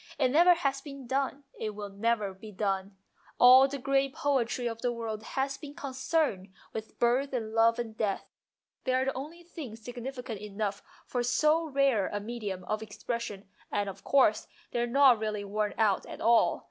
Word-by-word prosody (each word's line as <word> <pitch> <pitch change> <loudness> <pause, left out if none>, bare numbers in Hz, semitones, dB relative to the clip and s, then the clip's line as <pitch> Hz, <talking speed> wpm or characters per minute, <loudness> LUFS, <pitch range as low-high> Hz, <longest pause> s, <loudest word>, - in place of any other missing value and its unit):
It 260 -3 +3
never 345 +5 +6
has 275 -5 -1
been 275 -2 -9
done, 270 +2 -1 0.2
it 215 -1 -3 0.2
never 215 0 0
will 190 - -23
be 215 0 -9
done. 195 -1 -2 0.4
All 255 +2 +8
the 280 +1 -4
great 275 0 +1
poetry 260 -5 0
of 230 -1 -3
the 245 - +1
world 225 -2 -4
has 270 +4 -2
been 290 -1 -9
concerned 265 - -1 0.2
with 220 0 -7
birth 255 +4 +2
and 220 -3 -3
love 230 0 +4
and 230 -2 -4
death. 210 -3 -1 0.6
They 255 - +1
are 260 +1 +2
the 270 - 0
only 310 +6 -7
things 265 -10 -9
significant 245 -3 -6
enough 205 -1 -3 0.2
for 245 - -2
so 305 +7 +2
rare 270 -8 +2
a 205 - -3
medium 205 -4 -5
of 215 +4 -2
expression, 220 -1 -5 0.2
and, 205 -1 0
of 195 0 -8
course, 255 -6 +3 0.2
they 240 - -1
are 240 - +1
not 260 -2 +6
really 215 -1 -2
worn 210 +1 -2
out 210 -3 +2
at - - -8
all. 230 0 +4
240 Hz, 185 wpm, -30 LUFS, 215-270 Hz, 0.6 s, All